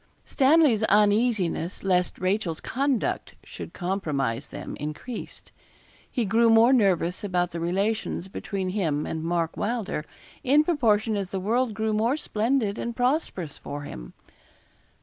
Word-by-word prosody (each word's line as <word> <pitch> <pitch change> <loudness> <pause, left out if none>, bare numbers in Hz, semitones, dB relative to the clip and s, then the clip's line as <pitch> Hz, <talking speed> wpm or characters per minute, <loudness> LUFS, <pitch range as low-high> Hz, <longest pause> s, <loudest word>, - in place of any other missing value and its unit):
Stanley's 275 -5 +4
uneasiness 205 -5 +2
lest 180 -2 +1
Rachel's 185 -3 -1
conduct 270 -1 -1
should - - -9
compromise 150 -9 -2
them - - -7
increased. 155 - -7 0.6
He 240 - -1
grew 230 +4 +4
more 225 +3 +6
nervous 185 -7 +2
about 180 -3 0
the 170 - -4
relations 195 +2 -1
between 190 0 -4
him 165 -7 -1
and 160 0 -4
Mark 165 -1 -1
Wylder, 215 -8 -2 0.4
in 290 +4 +5
proportion 225 -9 +2
as 195 -2 -2
the 190 - -3
world 225 +3 0
grew 220 0 0
more 230 +6 +1
splendid 225 -4 0
and 235 -1 -4
prosperous 245 - -1
for 145 0 -6
him. - - -9
205 Hz, 130 wpm, -26 LUFS, 175-235 Hz, 0.6 s, more